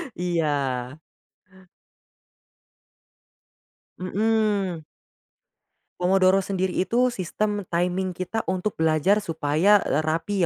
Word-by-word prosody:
Iya. 145 -6 -1 3.0
Mhm. 200 -3 0 1.2
Pomodoro 185 +1 +4
sendiri 190 -1 -2
itu, 245 +6 +2
sistem 205 +1 -3
timing 180 +1 -1
kita 185 +5 -3
untuk 185 0 -2
belajar 160 +6 +3
supaya, 165 +3 +2
eee, 145 - 0
rapi 165 +6 -1
185 Hz, 75 wpm, -24 LUFS, 160-205 Hz, 3.0 s, Pomodoro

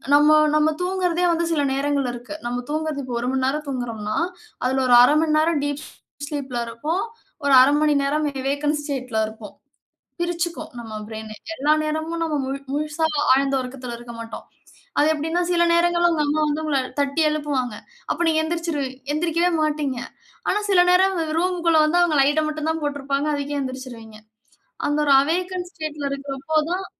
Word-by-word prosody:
நம்ம 300 +1 +6 0.2
நம்ம 305 +1 +3
தூங்குறதே 360 -1 0
வந்து 335 0 0
சில 295 -3 +1
நேரங்கள் 280 -1 0
இருக்கு. 245 +5 -8
நம்ம 245 +1 -3
தூங்குறது 310 -2 -2
இப்போ 245 - -4
1 245 - -1
மணி 260 -1 +1
நேரம் 300 +3 -2
தூங்குகுறோம்ன்னா, 230 -5 -3 0.5
அதுல 265 +1 +1
ஒரு 245 - +6
1/2 290 +4 +5
மணி 310 -1 +2
நேரம் 315 -2 +2
டீப் 290 0 -3 0.4
ஸ்லீப்ல 275 -5 -4
இருப்போம். 305 +11 -2 0.4
ஒரு 280 - +4
1/2 280 +3 +5
மணி 300 -1 +3
நேரம் 300 +2 0
வே 280 - -11
வேக்கன்ட் 295 +1 0
ஸ்டேட்ல 255 -6 -3
இருப்போம். 220 -1 -11 0.7
பிரிச்சுக்கும் 345 0 -2
நம்ம 225 -2 -8
ப்ரெயினே. 220 -1 -7 0.2
எல்லா 300 0 +2
நேரமும் 315 +2 -2
நம்ம 320 -2 -1
முழு 270 +1 -3
முழுசா 300 +2 -1 0.3
ஆழ்ந்த 275 +1 +2
உறக்கத்துல 250 -1 -6
இருக்க 240 0 -10
மாட்டோம். 230 0 -7 0.6
அது 295 - +4
எப்படீன்னா, 325 +4 -1
சில 345 -1 +3
நேரங்கள்ல 345 0 +3
உங்க 305 -2 +1
அம்மா 300 +2 +1
வந்து 300 +2 -1
உங்கள 285 -3 +1 0.2
தட்டி 280 +3 +1
எழுப்புவாங்க. 280 -6 -2 0.4
அப்ப - - -1
நீங்க 315 -1 +3
எந்திரிச்சுருவீ 330 -5 -2 0.2
எந்திரிக்கவே 335 +2 +1
மாட்டீங்க. 295 -4 -1 0.5
ஆனா 415 - +2
சில 365 -2 +6
நேரம் 380 +1 +4 0.2
ரூமுக்குள்ள 345 -2 +2
வந்து 335 +3 +2
அவுங்க 335 -4 +2
லைட்ட 290 +3 +3
மட்டும் 310 0 -3
தான் 320 0 -2
போட்ருப்பாங்க. 280 0 -1
அதுக்கே 285 0 -3
எந்திரிச்சுருவீங்க. 255 -5 -7 0.7
அந்த 290 +1 0
ஒரு 280 - +5
அவேக்கன் 355 +4 -2
ஸ்டேட்ல 305 -4 -4
இருக்குறப்போ 275 +2 -3
தான், 380 +1 -2
295 Hz, 165 wpm, -22 LUFS, 265-320 Hz, 0.7 s, நம்ம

